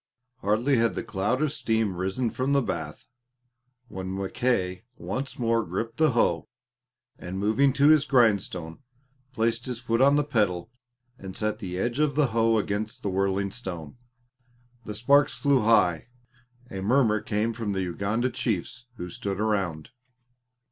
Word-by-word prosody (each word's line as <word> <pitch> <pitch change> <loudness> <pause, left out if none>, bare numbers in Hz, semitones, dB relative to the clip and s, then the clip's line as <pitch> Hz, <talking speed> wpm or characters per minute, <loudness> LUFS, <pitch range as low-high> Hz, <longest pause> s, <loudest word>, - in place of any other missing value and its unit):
Hardly 115 +7 +1
had 115 0 +2
the - - -3
cloud 105 +7 -1
of 155 - +1
steam 110 -4 0
risen 95 +6 -1
from 130 +2 -1
the 140 - +4
bath, 80 -7 -5 0.8
when 95 -2 -5
Mackay 95 -2 -1
once 135 +2 -4
more 115 -1 +1
gripped 115 +7 -4
the 155 -4 +3
hoe, 120 - +1 0.7
and 90 +2 -6
moving 110 +8 +3
to 140 +2 +4
his 155 -2 +6
grindstone 100 - +1 0.5
placed 115 0 -1
his 125 -2 -4
foot 115 -1 0
on 140 +2 +6
the 145 - +3
pedal 105 -9 0 0.5
and 95 -1 -8
set 110 0 -1
the 90 -3 -5
edge 120 +7 -1
of 150 -2 +2
the 145 -4 +3
hoe 115 0 +2
against 105 +1 -3
the 100 - -1
whirling 100 +1 0
stone. 90 -9 -7 0.9
The 105 - -5
sparks 140 +6 +3
flew 140 -2 +3
high. 105 -7 +3 0.6
A 95 - -5
murmur 110 0 +3
came 110 +2 -1
from 110 -3 -3
the 95 -1 -1
Uganda 100 +8 -1
chiefs 120 +3 -3
who 90 -5 -6
stood 100 +2 -4
around. 100 -6 -1
110 Hz, 155 wpm, -26 LUFS, 95-125 Hz, 0.9 s, his